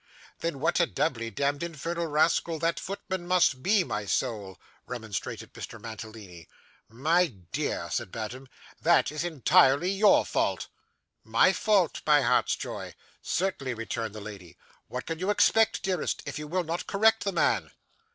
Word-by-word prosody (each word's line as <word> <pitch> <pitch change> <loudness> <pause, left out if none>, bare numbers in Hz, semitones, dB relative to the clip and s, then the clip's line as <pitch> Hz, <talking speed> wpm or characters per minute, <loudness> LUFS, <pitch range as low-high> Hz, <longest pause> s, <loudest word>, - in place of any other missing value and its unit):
'Then 165 -5 -3
what 170 +6 +1
a 170 - +4
doubly 115 -7 -1
demd 140 +3 -1
infernal 170 +1 -3
rascal 160 +2 +2
that 165 +1 0
footman 190 -2 -5
must 175 -7 +3
be, 195 +3 +3
my 105 -10 -3
soul,' 100 -1 -2 0.3
remonstrated 110 -5 -5
Mr. - - -8
Mantalini. 110 -6 -9 0.4
'My 160 +10 +2 0.2
dear,' - - -2
said - - -2
Madame, 120 +4 -6 0.3
'that - - +4
is 155 +2 -3
entirely 165 0 +4
your 200 +1 +5
fault.' - - 0 0.6
'My 115 - +4
fault, 195 -5 +2
my 150 -1 +6
heart's 125 +1 +2
joy?' - - -6 0.3
'Certainly,' 155 -9 -1
returned 115 -1 -4
the 110 - -7
lady; 100 -5 -10 0.3
'what 125 - -5
can 165 -1 -4
you 185 +3 -1
expect, 220 +1 +3
dearest, 185 -5 -1
if - - -5
you 150 - -6
will 180 +3 0
not 170 +1 -4
correct 220 +2 +3
the 200 - 0
man? - - +1
150 Hz, 150 wpm, -28 LUFS, 115-180 Hz, 0.6 s, my